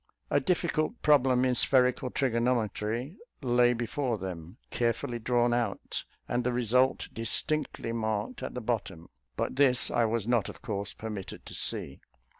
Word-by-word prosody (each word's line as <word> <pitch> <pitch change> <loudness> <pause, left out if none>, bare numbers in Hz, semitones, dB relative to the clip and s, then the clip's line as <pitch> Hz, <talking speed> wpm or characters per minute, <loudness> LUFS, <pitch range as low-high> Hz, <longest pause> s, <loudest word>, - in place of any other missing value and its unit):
A - - +4
difficult 180 +2 0
problem 130 -4 +4
in 130 - +2
spherical 125 0 +3
trigonometry 120 - -1 0.3
lay 120 -1 +4
before 120 +1 -2
them, 90 0 -7
carefully 120 0 -1
drawn 120 +1 +2
out, 120 -1 -2 0.2
and 120 0 0
the 125 - 0
result 125 +2 +2
distinctly 115 +3 0
marked 110 - -2
at - - -5
the 125 - -3
bottom; 110 -8 -3 0.3
but - - -2
this 130 -3 +5
I 120 - +3
was 110 -1 -1
not, 120 -3 +2
of - - -11
course, 100 -4 -3
permitted 105 -4 -7
to - - -9
see. - - -2
120 Hz, 145 wpm, -29 LUFS, 110-125 Hz, 0.3 s, this